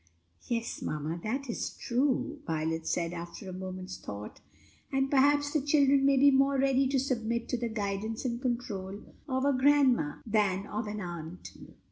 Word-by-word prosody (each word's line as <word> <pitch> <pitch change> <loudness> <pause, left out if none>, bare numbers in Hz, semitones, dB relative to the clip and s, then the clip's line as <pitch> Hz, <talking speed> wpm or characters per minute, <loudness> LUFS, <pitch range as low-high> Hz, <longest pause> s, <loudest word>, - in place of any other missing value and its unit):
"Yes, 230 -1 -2
mamma, 155 +3 -3
that 265 +6 -2
is 235 - -4
true," 275 +4 0
Violet 160 +1 -1
said, 170 0 0
after 175 +4 -7
a 185 - -6
moment's 185 0 -6
thought; 105 +1 -8 0.5
"and 270 0 +1
perhaps 285 +1 +4
the 305 - +2
children 280 -1 +4
may 275 -1 +4
be 280 +1 +7
more 275 +1 +3
ready 270 0 +3
to 270 0 +1
submit 235 -3 -1
to 250 - 0
the 235 -1 -2
guidance 215 +2 -3
and 235 -1 -2
control 210 -6 -4 0.2
of 260 +1 0
a 285 - +4
grandma 260 - +4
than 205 -3 +1
of 215 +1 -4
an 210 0 -4
aunt. 170 -1 -7
235 Hz, 165 wpm, -30 LUFS, 185-270 Hz, 0.5 s, be